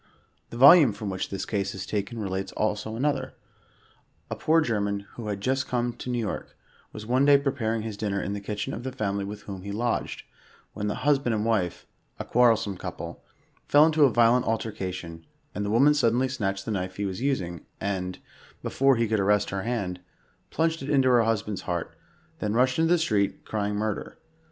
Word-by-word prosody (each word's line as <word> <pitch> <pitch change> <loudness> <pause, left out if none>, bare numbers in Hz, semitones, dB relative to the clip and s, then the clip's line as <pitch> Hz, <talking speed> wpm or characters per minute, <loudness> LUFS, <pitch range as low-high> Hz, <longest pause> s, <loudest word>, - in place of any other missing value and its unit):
The 115 - -8
volume 140 - +8
from 105 -1 -5
which 95 - -3
this 95 - -4
case 100 -2 -2
is 95 - -5
taken 105 +3 -3
relates 95 -2 -3
also 110 +1 -2
another. 140 +3 -1 1.0
A - - -1
poor 160 +1 +3
German, 105 -8 0
who 115 -3 -7
had 100 -2 -3
just 130 +4 0
come 120 -1 -1
to 125 - -8
New 125 - -1
York, 110 -3 -4 0.3
was 105 -1 -8
one 125 +4 +2
day 140 0 +7
preparing 120 -6 -1
his 110 -2 -5
dinner 100 -2 -1
in 100 - -3
the 100 - -3
kitchen 105 +1 -4
of - - -5
the 130 +1 -4
family 100 -4 -2
with 105 +1 -7
whom 95 -2 -7
he 100 +2 -6
lodged, 115 +3 -2 0.5
when 105 - -3
the 105 - -1
hus 145 -2 +4
band 120 -4 -1
and 105 0 -1
wife 105 -7 0 0.2
— - - -39
a - - -4
quarrelsome 115 -5 +3
couple - - -7 0.2
— - - -38
fell 145 +1 +7
into 160 -1 +3
a 135 - +3
violent 120 +2 +4
alter 110 0 -1
cation, 90 -4 -6 0.3
and 105 - -3
the 100 - -2
woman 135 +7 +5
suddenly 125 -2 +2
snatched 100 -7 -3
the 115 - -3
knife 95 -2 -3
he 100 - -2
was 95 +3 -4
using, 90 - -2
and, 90 -2 -3 0.5
before 135 0 +3
he 115 -1 +1
could 110 -1 +1
arrest 105 +1 +2
her 95 0 -2
hand, 100 -6 -3 0.5
plunged 165 0 0
it 135 - -5
into 135 -3 +4
her 120 -2 +5
husband's 110 -3 -1
heart, 85 -2 -4 0.4
then 105 0 -1
rushed 130 +4 +2
into 165 0 +3
the 175 - +5
street, 105 -11 0
crying 105 -1 -2
murder. 105 0 -3
110 Hz, 205 wpm, -26 LUFS, 100-125 Hz, 1.0 s, volume